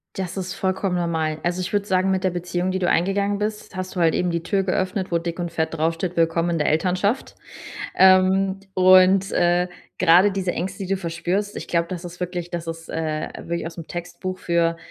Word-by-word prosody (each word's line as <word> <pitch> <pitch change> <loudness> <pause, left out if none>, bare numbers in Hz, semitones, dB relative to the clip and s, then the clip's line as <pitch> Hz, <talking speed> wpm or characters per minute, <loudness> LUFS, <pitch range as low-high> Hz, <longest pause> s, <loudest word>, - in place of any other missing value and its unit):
Das 185 -2 -4
ist 185 0 -4
vollkommen 190 -1 -1
normal. 160 -2 -1
Also, 175 +1 -1
ich 180 - -4
würde 205 -1 0
sagen, 190 0 +2
mit 190 0 0
der 185 - +2
Beziehung, 175 +1 -2
die 190 - -1
du 180 - +1
eingegangen 200 +3 +1
bist, 210 0 -4
hast 185 +1 -5
du 180 - 0
halt 165 -1 +4
eben 180 - 0
die 170 -1 -2
Tür 195 +1 0
geöffnet, 185 0 -1
wo 170 - +2
dick 170 +1 -5
und 170 -1 -3
fett 160 -1 -1
draufsteht: 165 +3 -1
„Willkommen 165 +1 +2
in 170 - 0
der 150 - 0
Elternschaft.“ 185 - 0 0.6
Ähm, 190 +1 +4
und, 185 +1 +5
äh, 175 +1 +2 0.3
grade 180 +3 +6
diese 190 -2 -1
Ängste, 190 +4 -4
die - - -6
du - - -4
verspürst, 180 +4 -2
ich - - -7
glaube, 170 -1 +1
das 180 -1 -6
ist 175 0 -9
wirklich 175 -1 -4
das 170 -1 -4
ist, 165 0 -7
äh, 155 -1 -2
wirklich 170 0 -3
ausm 165 -1 -7
Textbuch 185 +2 -6
für, 170 -1 +1
180 Hz, 210 wpm, -23 LUFS, 170-190 Hz, 0.6 s, grade